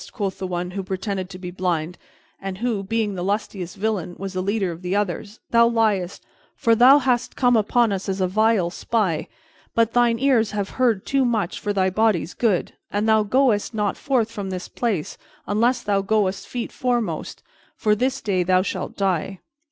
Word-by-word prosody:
quoth 200 Hz, -4 st, -3 dB
the 190 Hz, -, -3 dB
one 180 Hz, 0 st, -3 dB
who 195 Hz, +1 st, -3 dB
pretended 190 Hz, 0 st, -3 dB
to 185 Hz, -, -9 dB
be 180 Hz, -1 st, -7 dB
blind 175 Hz, -2 st, -2 dB, 0.5 s
and 195 Hz, -1 st, -5 dB
who, 230 Hz, -2 st, -1 dB
being 210 Hz, +1 st, -1 dB
the 180 Hz, -2 st, -4 dB
lustiest 200 Hz, -2 st, -3 dB
villain, 195 Hz, -4 st, -2 dB
was 195 Hz, 0 st, -5 dB
the 185 Hz, -, -1 dB
leader 200 Hz, -1 st, 0 dB
of 170 Hz, +1 st, -9 dB
the 180 Hz, +1 st, -2 dB
others, 205 Hz, +2 st, -2 dB
"thou 235 Hz, 0 st, +6 dB
liest! 215 Hz, -6 st, 0 dB, 0.3 s
For 230 Hz, -, +3 dB
thou 250 Hz, +5 st, +7 dB
hast 255 Hz, -3 st, 0 dB
come 245 Hz, -2 st, +3 dB
among 225 Hz, +1 st, +3 dB
us 195 Hz, 0 st, -3 dB
as 190 Hz, 0 st, -2 dB
a 185 Hz, -, +2 dB
vile 205 Hz, -2 st, +2 dB
spy. 190 Hz, -7 st, -1 dB, 0.5 s
But 230 Hz, -1 st, +2 dB
thine 240 Hz, -1 st, +3 dB
ears 240 Hz, -4 st, +3 dB
have 205 Hz, -2 st, -2 dB
heard 230 Hz, -6 st, +2 dB
too 275 Hz, -1 st, +2 dB
much 220 Hz, -6 st, -1 dB
for 205 Hz, -, -2 dB
thy 190 Hz, -2 st, +1 dB
body's 195 Hz, -5 st, +1 dB
good, 210 Hz, -7 st, 0 dB, 0.2 s
and 205 Hz, +2 st, -1 dB
thou 220 Hz, -1 st, +5 dB
goest 220 Hz, 0 st, +1 dB
not 210 Hz, -2 st, 0 dB
forth 250 Hz, -7 st, 0 dB
from 200 Hz, -3 st, -5 dB
this 185 Hz, -1 st, -5 dB
place 210 Hz, -11 st, -2 dB, 0.3 s
unless 235 Hz, +4 st, +1 dB
thou 200 Hz, -1 st, +1 dB
goest 195 Hz, -1 st, 0 dB
feet 245 Hz, -2 st, -4 dB
foremost, 240 Hz, -10 st, -2 dB, 0.3 s
for 210 Hz, -2 st, +2 dB
this 255 Hz, +5 st, 0 dB
day 195 Hz, -4 st, 0 dB
thou 185 Hz, +1 st, +3 dB
shalt -, -, -4 dB
die! 190 Hz, -1 st, -1 dB
205 Hz, 190 wpm, -23 LUFS, 185-230 Hz, 0.5 s, thou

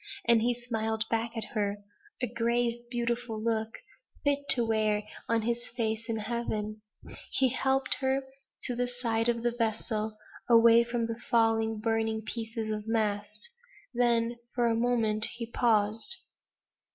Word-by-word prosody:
And 235 Hz, -1 st, +5 dB
he 240 Hz, +1 st, +1 dB
smiled 225 Hz, -2 st, -3 dB
back 230 Hz, +1 st, -2 dB
at 225 Hz, -, -2 dB
her; 205 Hz, -2 st, -1 dB, 0.5 s
a -, -, +4 dB
grave, 235 Hz, +1 st, -1 dB
beautiful 240 Hz, -1 st, -2 dB
look, 220 Hz, 0 st, -1 dB, 0.5 s
fit 285 Hz, 0 st, 0 dB
to 240 Hz, -3 st, +11 dB
wear 215 Hz, -2 st, 0 dB, 0.3 s
on 230 Hz, -1 st, +1 dB
his 235 Hz, +1 st, -2 dB
face 225 Hz, 0 st, -2 dB
in 225 Hz, -, -1 dB
heaven. 215 Hz, -1 st, -4 dB, 0.5 s
He 265 Hz, -1 st, +1 dB
helped 265 Hz, +2 st, 0 dB
her 265 Hz, 0 st, 0 dB, 0.4 s
to 245 Hz, -, -3 dB
the 245 Hz, +1 st, -1 dB
side 235 Hz, -2 st, -1 dB
of 235 Hz, -1 st, -1 dB
the 240 Hz, -, +1 dB
vessel, 220 Hz, -2 st, -2 dB, 0.3 s
away 230 Hz, 0 st, +6 dB
from 235 Hz, -1 st, -2 dB
the 230 Hz, 0 st, -5 dB
falling 225 Hz, -1 st, +2 dB
burning 225 Hz, -1 st, -1 dB
pieces 225 Hz, 0 st, -5 dB
of 210 Hz, 0 st, -5 dB
mast. 215 Hz, -, -2 dB, 0.4 s
Then 235 Hz, -1 st, +1 dB, 0.2 s
for 240 Hz, -1 st, +1 dB
a 230 Hz, -1 st, +2 dB
moment 225 Hz, -2 st, +4 dB
he 235 Hz, 0 st, -5 dB
paused. 225 Hz, -, +2 dB
230 Hz, 145 wpm, -29 LUFS, 220-240 Hz, 0.5 s, to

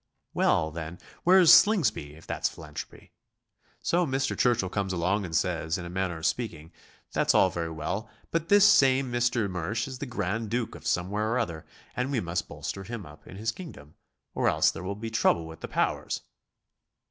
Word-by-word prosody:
Well, 80 Hz, -, +2 dB
then, 80 Hz, +1 st, -6 dB, 0.3 s
where's 180 Hz, -1 st, +7 dB
Slingsby, 125 Hz, -, +4 dB
if 80 Hz, -, -15 dB
that's -, -, -1 dB
philanthropy? -, -, -10 dB, 0.7 s
So 175 Hz, +1 st, +2 dB
Mr. 135 Hz, -3 st, -1 dB
Churchill 120 Hz, -6 st, +2 dB
comes 95 Hz, 0 st, -2 dB
along 95 Hz, +4 st, 0 dB
and 85 Hz, -2 st, -5 dB
says, 80 Hz, -1 st, 0 dB
in 90 Hz, -, -6 dB
a 85 Hz, -, -7 dB
manner 95 Hz, -2 st, -2 dB
of 80 Hz, -, -6 dB
speaking, 85 Hz, -10 st, -2 dB, 0.4 s
"That's -, -, +2 dB
all 95 Hz, -, +5 dB
very 85 Hz, -1 st, -3 dB
well, 90 Hz, +8 st, -4 dB, 0.2 s
but 165 Hz, 0 st, -1 dB
this 205 Hz, 0 st, +7 dB
same 135 Hz, -8 st, +4 dB
Mr. 120 Hz, -3 st, +1 dB
Mersch 95 Hz, +6 st, -2 dB
is 130 Hz, -2 st, -7 dB
the 140 Hz, -, -4 dB
grand 110 Hz, -1 st, -2 dB
duke 120 Hz, 0 st, -2 dB
of 85 Hz, -1 st, -8 dB
somewhere 105 Hz, +5 st, 0 dB
or -, -, +1 dB
other, 80 Hz, -8 st, -3 dB, 0.3 s
and 125 Hz, +2 st, -1 dB
we 130 Hz, -, +1 dB
must 85 Hz, -3 st, -2 dB
bolster 95 Hz, -, -6 dB
him 110 Hz, -1 st, -6 dB
up 75 Hz, +1 st, -15 dB
in -, -, -10 dB
his 110 Hz, +2 st, -1 dB
kingdom, 80 Hz, -, -11 dB, 0.4 s
or -, -, +2 dB
else -, -, +3 dB
there -, -, -8 dB
will 95 Hz, +2 st, -4 dB
be 110 Hz, +2 st, -6 dB
trouble 85 Hz, -7 st, +2 dB
with 80 Hz, -1 st, -10 dB
the -, -, -6 dB
powers." -, -, -1 dB
100 Hz, 190 wpm, -28 LUFS, 85-125 Hz, 0.7 s, where's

